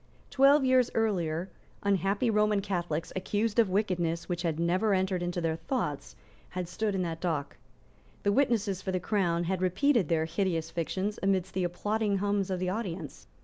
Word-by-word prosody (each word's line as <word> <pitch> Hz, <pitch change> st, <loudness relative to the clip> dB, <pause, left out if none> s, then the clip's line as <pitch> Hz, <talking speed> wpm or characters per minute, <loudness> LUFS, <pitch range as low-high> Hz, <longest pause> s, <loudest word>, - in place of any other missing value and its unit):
Twelve 275 Hz, +1 st, +5 dB
years 255 Hz, -2 st, +4 dB
earlier, 180 Hz, -6 st, 0 dB, 0.4 s
unhappy 200 Hz, +4 st, +1 dB
Roman 210 Hz, -1 st, +3 dB
Catholics, 175 Hz, -5 st, -3 dB
accused 210 Hz, +4 st, 0 dB
of 220 Hz, -4 st, +4 dB
wickedness 180 Hz, -4 st, 0 dB
which 175 Hz, -1 st, -2 dB
had 165 Hz, -3 st, -1 dB
never 185 Hz, +5 st, +2 dB
entered 185 Hz, -1 st, 0 dB
into 175 Hz, 0 st, -2 dB
their 160 Hz, -1 st, 0 dB
thoughts, 165 Hz, -, -3 dB, 0.3 s
had 180 Hz, -1 st, -4 dB
stood 210 Hz, +3 st, -2 dB
in 185 Hz, -, 0 dB
that 165 Hz, -1 st, -4 dB
dock. 160 Hz, -6 st, -2 dB, 0.7 s
The 200 Hz, -, +3 dB
witnesses 215 Hz, -6 st, +1 dB
for 190 Hz, -, -3 dB
the 185 Hz, -, 0 dB
Crown 175 Hz, -3 st, 0 dB
had 185 Hz, +1 st, -1 dB
repeated 200 Hz, -, +2 dB
their 160 Hz, -1 st, +2 dB
hideous 165 Hz, -1 st, -1 dB
fictions 190 Hz, +5 st, -2 dB
amidst 190 Hz, -1 st, 0 dB
the 185 Hz, -, 0 dB
applauding 205 Hz, +3 st, 0 dB
hums 200 Hz, -1 st, 0 dB
of 185 Hz, -, -1 dB
the 185 Hz, -, -1 dB
audience. 180 Hz, -, -5 dB
190 Hz, 170 wpm, -29 LUFS, 170-210 Hz, 0.7 s, Twelve